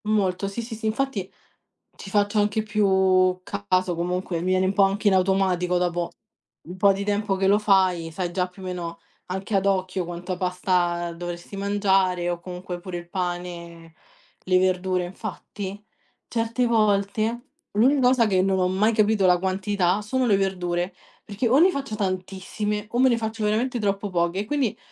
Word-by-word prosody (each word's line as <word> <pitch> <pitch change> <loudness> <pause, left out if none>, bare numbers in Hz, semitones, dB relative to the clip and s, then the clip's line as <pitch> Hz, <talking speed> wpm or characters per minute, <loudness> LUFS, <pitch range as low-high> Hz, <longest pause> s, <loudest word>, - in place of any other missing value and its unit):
Molto. 195 -3 +1
Sì, 200 +4 -4
sì, 230 0 -7
sì, 220 0 -4
infatti 220 -4 -2 0.6
ci 195 - -10
faccio 205 +1 +2
anche 210 +1 +1
più 190 -3 +2
caso, 175 - -1
comunque 180 0 -2
mi - - -4
viene 185 0 +2
un 190 - 0
po' 200 0 +4
anche 200 +2 +1
in 195 - +5
automatico, 185 -1 +2
dopo 175 -1 -1 0.6
un 180 +2 -8
po' 200 +1 +5
di 195 +1 -3
tempo 205 -1 0
che 190 0 +1
lo 200 +1 +5
fai, 190 -5 +2
sai 175 +1 -3
già 180 0 0
più 180 +2 -15
o - - -8
meno, 170 -2 -5 0.3
anche 190 +3 -3
ad 195 0 +2
occhio 185 -2 0
quanta 175 +1 -5
pasta 180 -2 0
dovresti 175 +3 -7
mangiare, 195 -3 +1
o 175 -1 -2
comunque 180 0 -7
pure 175 0 -6
il 175 0 -10
pane, 175 -2 -5 0.5
le 185 0 +3
verdure. 185 0 +1
Infatti 200 +1 -7 0.4
certe 230 +1 0
volte 220 +2 +1 0.3
l'unica 260 +7 +3
cosa 250 -2 +4
che 185 -2 +2
non 190 0 +1
ho 180 - +2
mai 200 +5 +2
capito 215 -2 +3
la 180 -1 +5
quantità, 190 0 0
sono 255 +4 0
le 205 -3 +4
verdure, 180 -2 -1 0.3
perché 210 +4 -2
o 250 +4 +4
ne 360 +5 +6
faccio 275 -8 -4
tantissime, 200 +2 -3
o 240 - -1
me 260 0 +6
ne 235 - +2
faccio 220 -1 -3
veramente 235 +4 0
troppo 200 -1 -1
poche, 175 +1 0
e 205 - -2
quindi, 270 -2 -1
190 Hz, 180 wpm, -24 LUFS, 180-210 Hz, 0.6 s, ne